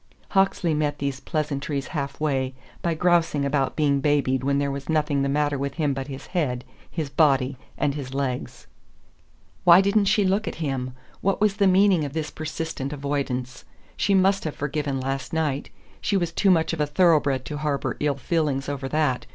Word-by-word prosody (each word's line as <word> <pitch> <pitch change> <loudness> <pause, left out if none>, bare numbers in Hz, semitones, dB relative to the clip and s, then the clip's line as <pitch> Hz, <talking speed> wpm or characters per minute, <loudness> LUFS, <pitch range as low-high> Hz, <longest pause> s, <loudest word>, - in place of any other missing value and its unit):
Hawksley 195 -4 +2
met 150 -1 0
these 140 -2 -3
pleasantries 140 -3 -3
halfway 140 -3 -2 0.3
by 170 -1 0
grousing 165 -4 +2
about 140 -1 0
being 145 -3 +2
babied 135 -3 +1
when 140 +1 +1
there 140 0 0
was 140 +1 -6
nothing 150 -3 +1
the 140 - 0
matter 145 0 +1
with 140 0 -3
him 150 -4 +1
but 135 0 -4
his 135 -1 -7
head, 130 -9 0 0.3
his 160 -4 -3
body, 140 -2 +2 0.2
and 145 - +1
his 135 -3 -6
legs. 135 -2 -3 1.0
Why 175 0 +8
didn't 200 +1 +3
she 205 0 +3
look 195 +3 +1
at - - -3
him? 130 -5 -3 0.3
What 195 0 +1
was 210 -1 +2
the 200 -2 +4
meaning 190 -3 +4
of 140 -2 -4
this 155 -2 -3
persistent 155 -3 -4
avoidance? 140 -3 -3 0.3
She 200 - +2
must 195 +1 +3
have 155 - -4
forgiven 145 -1 -2
last 135 +2 -3
night. 150 -4 -1 0.3
She 200 - +1
was 175 -3 -1
too 195 +4 +2
much 165 -3 +3
of 160 - -2
a 150 - +1
thoroughbred 145 -5 +3
to 150 - -5
harbour 145 -2 -1
ill 145 -2 0
feeling 145 -2 0
over 140 -2 -3
that. 150 -4 0
145 Hz, 185 wpm, -24 LUFS, 140-165 Hz, 1.0 s, Why